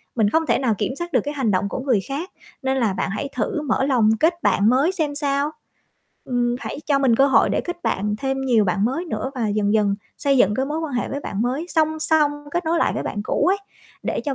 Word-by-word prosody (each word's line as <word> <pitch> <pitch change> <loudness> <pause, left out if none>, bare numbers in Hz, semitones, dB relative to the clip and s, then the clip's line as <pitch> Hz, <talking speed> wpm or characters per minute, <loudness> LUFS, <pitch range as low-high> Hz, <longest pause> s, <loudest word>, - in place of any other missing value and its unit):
mình 220 -4 +3
không 320 +7 +1
thể - - +2
nào 245 -5 +1
kiểm 260 - -2
soát 345 +2 -6
được - - +4
cái 290 - -4
hành 265 -7 0
động 195 +1 0
của - - -4
người 255 -5 +1
khác, 295 +7 -4 0.3
nên 265 -1 0
là 225 -6 +1
bạn - - -2
hãy 275 +8 -3
thử 255 +6 -1
mở 265 -3 0
lòng 240 -6 +3
kết 340 +2 +1
bạn 205 +2 +3
mới 275 +8 +3
xem 310 -6 -2
sao. 285 0 0 0.7
Ừm, 245 -1 0
hãy - - -5
cho 280 -2 +3
mình 255 -4 +3
cơ 275 - +5
hội 275 - +4
để - - +1
kết 350 0 -6
bạn 210 +2 -1
thêm 270 +1 -2
nhiều 240 -5 +3
bạn 195 +2 +1
mới 270 +9 -1
nữa 285 -5 -3
và 230 -4 -1
dần 205 0 +1
dần 210 -2 +2 0.2
xây 280 -2 +2
dựng 205 -2 +4
cái 265 +4 -1
mối 305 +2 -2
quan 320 -4 -4
hệ 245 - -1
với 280 +1 -4
bạn 205 -3 -3
mới, 265 +8 -1
song 315 -2 +1
song 310 -1 +3 0.2
kết 345 +3 -2
nối 330 +1 +1
lại - - +2
với - - -2
bạn 205 - -4
cũ - - 0
ấy, 385 +3 +3 0.5
để - - -2
cho 280 -2 -1
270 Hz, 260 wpm, -22 LUFS, 225-305 Hz, 0.7 s, cơ